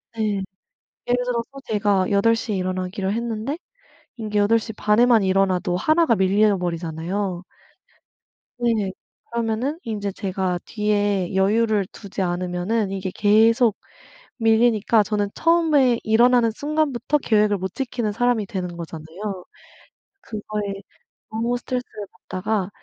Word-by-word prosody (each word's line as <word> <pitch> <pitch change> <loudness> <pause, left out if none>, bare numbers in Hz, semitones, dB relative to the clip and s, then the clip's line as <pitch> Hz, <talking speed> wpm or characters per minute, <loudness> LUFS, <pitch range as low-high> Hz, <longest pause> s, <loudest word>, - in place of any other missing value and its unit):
네. 210 -3 -1 0.6
예를 245 0 +1
들어서 235 -2 -2 0.2
제가 205 -3 +1
8:00 225 +2 +2
에 - - 0
일어나기로 185 +1 -2
했는데 235 +5 -3 0.6
이게 210 -2 -1
8:30 215 0 +2
에만 240 -4 +5
일어나도 190 -2 +1
1 315 - +3
가 230 - +3
밀려버리잖아요. 185 -2 0 1.1
네. 225 -5 0 0.4
그러면은 235 +6 -1
인제 205 -3 -3
제가 185 -2 -2
뒤에 205 -3 0
여유를 210 +1 +2
두지 200 -2 -7
않으면은 180 +4 -1
이게 190 -1 -3
계속 220 +2 +4 0.6
밀리니까 225 -1 +3
저는 205 0 -1
처음에 310 -8 +3
일어나는 235 +1 +4
순간부터 295 0 0
계획을 210 -5 +2
못 190 -1 -5
지키는 245 -5 -2
사람이 240 -2 +1
되는 180 -3 -4
거잖아요. 170 +4 -7 0.8
그거에 210 - -4 0.6
너무 230 +2 -1
스트레스를 245 -4 -5
받다가 200 0 -3
210 Hz, 270 characters per minute, -22 LUFS, 190-230 Hz, 1.1 s, 에만